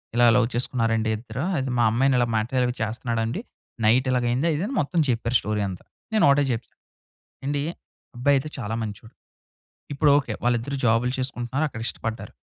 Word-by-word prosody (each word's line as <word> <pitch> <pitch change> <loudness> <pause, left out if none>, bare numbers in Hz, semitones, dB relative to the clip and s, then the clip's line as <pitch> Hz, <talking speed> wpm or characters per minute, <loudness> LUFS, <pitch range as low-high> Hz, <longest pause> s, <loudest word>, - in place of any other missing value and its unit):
ఇలా 120 0 +5
లవ్ 125 -2 +4
చేసుకున్నారండి 115 -2 0
ఇద్దరు 115 +4 -5
అది 135 0 -1
మా - - +4
అమ్మాయిని 130 +3 +3
ఇలా 120 - +2
మ్యాటర్ 125 +4 +1
అవి 125 - -1
చేస్తున్నాడండి. 115 - -2 0.4
నైట్ 125 +4 +4
ఇలాగయింది 125 +3 +1
అది 160 - +1
ఇది 185 - -1
అని 270 - -4
మొత్తం 165 +4 -1
చెప్పారు 120 0 0
స్టోరీ 105 0 -2
అంతా. 90 - -8 0.3
నేనొకటే 145 -9 +5
చెప్పా 115 +1 -6 0.7
ఏండీ 145 0 0 0.6
అబ్బాయి 140 +4 +3
అయితే 135 +3 -3
చాలా 110 -4 -3
మంచోడు. 110 +2 -8 0.8
ఇపుడొకే 145 -1 +3
వాళ్ళిద్దరూ 120 +3 0
జాబులు 120 +2 +3
చేసుకుంటున్నారు. 130 +2 -2
అక్కడ 110 -5 -8
ఇష్టపడ్డారు. 115 0 -5
120 Hz, 160 wpm, -24 LUFS, 115-135 Hz, 0.8 s, ఇలా